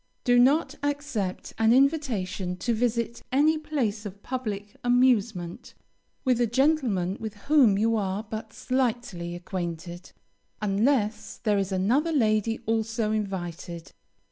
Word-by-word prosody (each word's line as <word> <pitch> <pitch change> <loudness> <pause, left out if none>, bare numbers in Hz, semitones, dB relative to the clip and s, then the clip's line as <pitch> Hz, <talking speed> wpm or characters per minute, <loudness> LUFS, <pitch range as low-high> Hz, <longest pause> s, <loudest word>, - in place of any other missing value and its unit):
Do 245 -1 +4
not 280 +3 +4
accept 285 -10 -3
an 225 0 +4
invitation 230 - +1
to 235 +5 0
visit 235 0 -1
any 305 +4 +3
place 250 -9 -2
of 200 -1 -9
public 210 -5 -4
amusement, 235 -8 +1 0.5
with 250 -2 +2
a 240 - +3
gentleman 240 - +1
with 220 -1 -5
whom 240 -2 +4
you 225 +2 +2
are 200 -1 -1
but 220 0 -7
slightly 240 -9 -2
acquainted, 175 0 -6 0.5
unless 215 +1 0
there 210 -3 +1
is 195 0 -2
another 240 - +2
lady 225 -5 +2
also 225 0 0
invited. 175 -5 -4
220 Hz, 120 wpm, -26 LUFS, 195-255 Hz, 0.5 s, Do